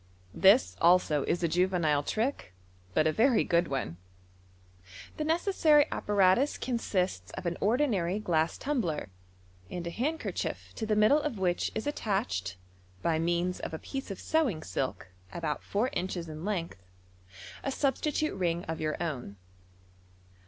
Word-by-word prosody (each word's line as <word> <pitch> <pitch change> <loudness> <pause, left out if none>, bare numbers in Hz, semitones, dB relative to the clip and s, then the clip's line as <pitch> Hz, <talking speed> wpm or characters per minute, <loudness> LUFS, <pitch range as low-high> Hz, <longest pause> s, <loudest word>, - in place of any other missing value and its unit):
— 90 - -28
This 215 +7 +6
also 170 -4 +4
is 175 - 0
a - - +4
juvenile 170 -4 +2
trick, 220 - -2 0.4
but 155 - +4
a 155 - +4
very 235 - +3
good 170 0 +2
one. 130 - -3 1.2
The 305 - -1
necessary 320 -2 +4
apparatus 205 +7 +2
consists 185 - -1
of - - -7
an 170 0 -1
ordinary 210 -6 +1
glass 165 -6 0
tumbler, 185 - -2 0.6
and 175 -1 -5
a 170 - -3
handkerchief 300 - -3
to 220 - -3
the 215 - +2
middle 215 +9 +5
of 295 -7 -3
which 180 -2 0
is 220 - -2
ittachtd, 95 - -2 0.5
by 160 -1 +2
means 175 +2 0
of 160 - -5
a - - -3
piece 270 - -6
of 195 - -6
sewing 260 - 0
silk 100 -8 -3 0.2
about 160 -3 -3
four 225 +6 0
inches 175 -2 -3
in 155 0 -7
length, 175 - -3 0.8
a - - -1
substitute 295 +3 0
ring 175 -2 -1
of 160 0 -5
your 155 -1 -1
own. 135 -11 -4
180 Hz, 145 wpm, -30 LUFS, 160-240 Hz, 1.2 s, This